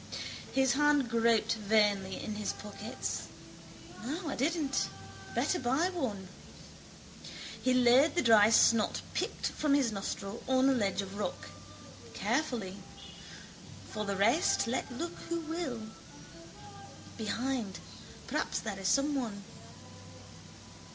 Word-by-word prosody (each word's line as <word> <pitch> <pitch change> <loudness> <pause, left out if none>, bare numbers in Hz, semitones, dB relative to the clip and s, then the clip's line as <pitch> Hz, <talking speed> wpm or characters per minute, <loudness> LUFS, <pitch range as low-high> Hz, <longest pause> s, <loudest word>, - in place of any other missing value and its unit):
His 265 -2 +3
hand 290 -4 +3
groped 230 -1 +3
vainly 205 -3 +1
in 215 - -4
his 210 -1 -2
pockets. 205 0 -5 0.8
No, 310 +7 -3
I - - -3
didn't. 290 0 0 0.5
Better 360 - +1
buy 270 +9 +1
one. 220 - -3 1.3
He 255 0 +2
laid 255 +6 +5
the 345 - +2
dry 220 -3 +7
snot 225 -1 +4
picked - - -2
from 295 -2 +1
his 265 -5 +2
nostril 195 +1 -5
on 260 0 +4
a - - +4
ledge 200 -5 0
of 195 +1 -8
rock, - - -4 0.7
carefully. 230 -11 -1 1.1
For 215 - -3
the 200 -1 -1
rest 230 - +3
let 250 +3 -2
look 330 +7 -4
who 335 0 -1
will. 320 -8 -4 1.3
Behind. 230 -1 -2 0.5
Perhaps - - -1
there 205 -3 -5
is 190 - -2
someone. 265 -6 +1
240 Hz, 115 wpm, -32 LUFS, 210-280 Hz, 1.3 s, dry